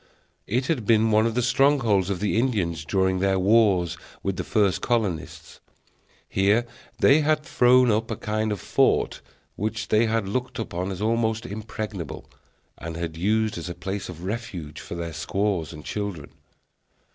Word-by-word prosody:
It 125 Hz, +5 st, 0 dB
had 130 Hz, -9 st, -1 dB
been 110 Hz, -1 st, +4 dB
one 110 Hz, +1 st, +4 dB
of 115 Hz, -, -3 dB
the 125 Hz, -, +1 dB
strongholds 125 Hz, -7 st, +3 dB
of 95 Hz, -3 st, -2 dB
the 105 Hz, +2 st, +1 dB
Indians 95 Hz, -10 st, -1 dB
during 95 Hz, +3 st, +1 dB
their 95 Hz, 0 st, +2 dB
wars 95 Hz, -3 st, +3 dB, 0.2 s
with 95 Hz, -1 st, -1 dB
the -, -, -3 dB
first 100 Hz, -3 st, +1 dB
colonists. 105 Hz, -10 st, -2 dB, 0.7 s
Here 100 Hz, +5 st, +2 dB, 0.3 s
they 140 Hz, +3 st, +5 dB
had 155 Hz, 0 st, +1 dB
thrown 125 Hz, -2 st, +4 dB
up 110 Hz, +2 st, 0 dB
a 110 Hz, -, -2 dB
kind 110 Hz, +1 st, -2 dB
of 105 Hz, -, -2 dB
fort, -, -, +1 dB, 0.3 s
which 110 Hz, +2 st, -3 dB
they 110 Hz, +2 st, +4 dB
had 110 Hz, -2 st, 0 dB
looked 125 Hz, +4 st, -3 dB
upon 95 Hz, -5 st, -3 dB
as 95 Hz, +1 st, -4 dB
almost 115 Hz, 0 st, 0 dB
impregnable, 105 Hz, -3 st, -6 dB, 0.5 s
and 80 Hz, +1 st, -6 dB
had 85 Hz, -2 st, -4 dB
used 105 Hz, +3 st, 0 dB
as 85 Hz, -, -6 dB
a 85 Hz, -, -5 dB
place 95 Hz, +3 st, -5 dB
of 85 Hz, -1 st, -9 dB
refuge 95 Hz, -7 st, -5 dB
for -, -, -7 dB
their 85 Hz, -1 st, -5 dB
squaws 90 Hz, -1 st, -1 dB
and 75 Hz, -, -10 dB
children. 100 Hz, -8 st, -4 dB
105 Hz, 165 wpm, -25 LUFS, 90-115 Hz, 0.7 s, they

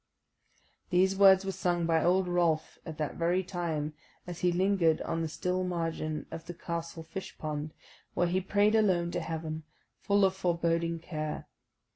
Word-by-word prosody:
These 190 Hz, +1 st, +3 dB
words 195 Hz, -1 st, +7 dB
were 195 Hz, -, -1 dB
sung 175 Hz, -2 st, 0 dB
by 165 Hz, -1 st, +2 dB
old 180 Hz, +1 st, +3 dB
Rolf 170 Hz, -3 st, +1 dB
at 160 Hz, -2 st, -6 dB
that 150 Hz, -2 st, -3 dB
very 175 Hz, +3 st, +1 dB
time, 165 Hz, -5 st, -3 dB, 0.3 s
as 175 Hz, -1 st, -7 dB
he 180 Hz, -, +2 dB
lingered 180 Hz, -3 st, +3 dB
on 165 Hz, -, -2 dB
the 165 Hz, -, -1 dB
still 180 Hz, +3 st, -1 dB
margin 165 Hz, -3 st, -2 dB
of 160 Hz, -, -7 dB
the 175 Hz, -, -6 dB
castle 170 Hz, -1 st, -5 dB
fish 165 Hz, +4 st, -7 dB
pond, 150 Hz, 0 st, -4 dB, 0.4 s
where 175 Hz, -, +3 dB
he 180 Hz, +2 st, +1 dB
prayed 205 Hz, +3 st, +3 dB
alone 185 Hz, -6 st, +3 dB
to -, -, -1 dB
Heaven, 160 Hz, -1 st, -4 dB, 0.4 s
full 200 Hz, 0 st, +3 dB
of 190 Hz, 0 st, +1 dB
foreboding 170 Hz, -2 st, 0 dB
care. 155 Hz, -2 st, -5 dB
170 Hz, 165 wpm, -30 LUFS, 160-185 Hz, 0.4 s, words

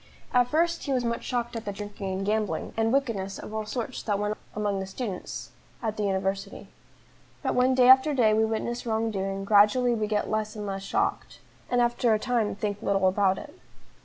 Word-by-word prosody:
At 245 Hz, -1 st, +4 dB
first 335 Hz, +4 st, +1 dB
he 280 Hz, -, -2 dB
was 250 Hz, -2 st, +1 dB
much 235 Hz, 0 st, -2 dB
shocked 240 Hz, -1 st, -2 dB
at 225 Hz, -, -4 dB
the 205 Hz, -, -2 dB
drinking 205 Hz, -1 st, -6 dB
and 190 Hz, +1 st, -2 dB
gambling, 215 Hz, 0 st, -1 dB
and 225 Hz, 0 st, +1 dB
wickedness 225 Hz, -8 st, -1 dB
of 215 Hz, -, -9 dB
all 215 Hz, -1 st, -3 dB
sorts 245 Hz, +3 st, -4 dB
that 205 Hz, -2 st, 0 dB
went 210 Hz, +1 st, -1 dB
on -, -, -14 dB, 0.2 s
among 205 Hz, -2 st, -1 dB
the 190 Hz, -, -4 dB
students 195 Hz, -2 st, -5 dB, 0.3 s
at 220 Hz, -2 st, -1 dB
the 215 Hz, -, -3 dB
university. 195 Hz, +1 st, -2 dB, 0.7 s
But -, -, 0 dB
when 255 Hz, +1 st, +3 dB
day 250 Hz, -1 st, +5 dB
after 265 Hz, +3 st, +7 dB
day 225 Hz, -4 st, +4 dB
we 220 Hz, +1 st, +3 dB
witness 225 Hz, +2 st, -2 dB
wrong 225 Hz, 0 st, 0 dB
doing, 195 Hz, -1 st, -3 dB
gradually 215 Hz, +5 st, +5 dB
we 215 Hz, -2 st, -1 dB
get 210 Hz, -1 st, 0 dB
less 215 Hz, 0 st, -2 dB
and 210 Hz, -1 st, -5 dB
less 195 Hz, -1 st, -4 dB
shocked, 195 Hz, -, -1 dB, 0.3 s
and 245 Hz, -, +2 dB
after 240 Hz, -1 st, +2 dB
a -, -, +2 dB
time 230 Hz, -2 st, 0 dB
think 205 Hz, 0 st, -3 dB
little 195 Hz, -3 st, +2 dB
about 190 Hz, 0 st, +2 dB
it. -, -, -9 dB
215 Hz, 210 wpm, -27 LUFS, 200-240 Hz, 0.7 s, after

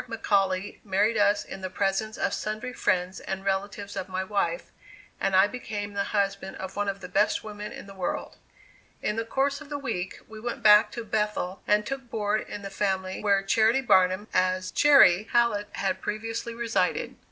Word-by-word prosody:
McAuley 195 Hz, -4 st, 0 dB
married 205 Hz, +3 st, +1 dB
us 205 Hz, 0 st, +3 dB
in 190 Hz, -, -8 dB
the 185 Hz, -, -4 dB
presence 200 Hz, +3 st, -1 dB
of -, -, 0 dB
sundry 215 Hz, +4 st, -4 dB
friends 180 Hz, -4 st, 0 dB
and 190 Hz, 0 st, -5 dB
relatives 200 Hz, +1 st, -2 dB
of 190 Hz, -1 st, -4 dB
my 185 Hz, 0 st, -2 dB
wife, 205 Hz, -, -2 dB, 0.5 s
and 195 Hz, -1 st, +1 dB
I 190 Hz, +1 st, +7 dB
became 205 Hz, -2 st, -5 dB
the 200 Hz, 0 st, -1 dB
husband 195 Hz, -2 st, -1 dB
of 190 Hz, -, -7 dB
one 205 Hz, 0 st, 0 dB
of 195 Hz, 0 st, -5 dB
the 180 Hz, -, -7 dB
best 195 Hz, +3 st, +1 dB
women 210 Hz, -1 st, -7 dB
in -, -, -9 dB
the 195 Hz, -, -11 dB
world. 185 Hz, -2 st, -4 dB, 0.7 s
In 210 Hz, -, 0 dB
the 225 Hz, -, -1 dB
course 275 Hz, +4 st, 0 dB
of 300 Hz, -, -11 dB
the 290 Hz, -, -3 dB
week 195 Hz, -10 st, -4 dB
we 220 Hz, 0 st, -10 dB
went 235 Hz, 0 st, -5 dB
back 210 Hz, 0 st, +7 dB
to 235 Hz, -1 st, -5 dB
Bethel 210 Hz, -3 st, -2 dB
and 210 Hz, 0 st, +3 dB
took 265 Hz, -1 st, -5 dB
board 215 Hz, -1 st, 0 dB
in 205 Hz, -, -6 dB
the 195 Hz, -, -6 dB
family 190 Hz, -1 st, -1 dB
where 200 Hz, -2 st, +2 dB
Charity 220 Hz, +6 st, +3 dB
Barnum 190 Hz, -3 st, +3 dB
as 185 Hz, 0 st, +1 dB
"Chairy" 215 Hz, -9 st, +6 dB
Hallett 235 Hz, -4 st, +2 dB
had 190 Hz, -1 st, -2 dB
previously 225 Hz, +2 st, -4 dB
resided. 230 Hz, -6 st, -1 dB
205 Hz, 185 wpm, -27 LUFS, 190-220 Hz, 0.7 s, I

